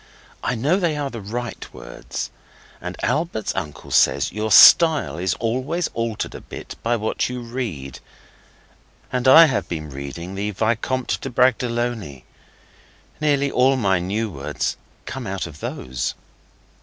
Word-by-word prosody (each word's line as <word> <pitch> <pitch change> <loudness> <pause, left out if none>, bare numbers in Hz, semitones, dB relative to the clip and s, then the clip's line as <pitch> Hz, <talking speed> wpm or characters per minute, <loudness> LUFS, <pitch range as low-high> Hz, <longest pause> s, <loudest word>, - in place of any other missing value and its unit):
I 125 - 0
know 145 +11 +2
they 170 -6 0
are 140 -2 -3
the 115 - -7
right 115 +4 -6
words. - - -7 0.5
And - - -6
Albert's 145 -3 -1
uncle 75 -6 -6
says - - +3
your 110 0 -3
style 145 - +7
is 90 0 0
always 130 +9 -1
altered 115 -2 -3
a - - -8
bit - - -9
by 120 +1 +1
what 110 +1 -1
you 125 0 -4
read. 115 - -5 1.1
And 125 0 0
I 160 +5 +10
have 135 -5 -1
been 75 -3 -5
reading 70 +7 -7
the 100 +2 -2
Vicomte 120 +5 -1
de 135 - -4
Bragelonne. 120 - 0 1.0
Nearly 140 -2 +1
all 130 +2 +4
my 95 -7 +2
new 105 +5 -2
words 70 -5 -3 0.3
come 130 -3 -6
out 95 0 -3
of 80 -2 -10
those.) 65 -4 -4
115 Hz, 145 wpm, -22 LUFS, 95-130 Hz, 1.1 s, I